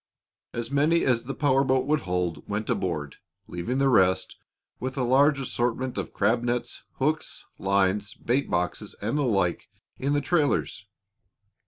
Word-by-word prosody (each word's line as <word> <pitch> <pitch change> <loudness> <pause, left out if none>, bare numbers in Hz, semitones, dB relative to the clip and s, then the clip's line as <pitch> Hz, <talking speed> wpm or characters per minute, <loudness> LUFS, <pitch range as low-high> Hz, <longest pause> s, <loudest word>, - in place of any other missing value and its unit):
As 115 +2 -4
many 150 +4 +3
as 120 -3 +2
the 135 - -4
power 135 -2 +3
boat 130 -1 +2
would 150 +1 +2
hold 90 - -3
went 105 +1 -2
aboard, 75 -6 -2 0.3
leaving 90 +9 -3
the 135 0 +3
rest, 95 -6 +3 0.4
with 130 +2 -4
a 130 - +1
large 135 +3 +4
assortment 125 0 -2
of - - -4
crab 110 +4 +1
nets, 120 0 -2
hooks, 155 +4 -2
lines, 100 +1 +1
bait 130 +4 -1
boxes, 90 +4 -2
and 110 +6 -2
the 150 - +1
like, 100 -9 0 0.3
in 140 +2 0
the 145 - +3
trailers. 145 - 0
120 Hz, 155 wpm, -26 LUFS, 100-135 Hz, 0.4 s, large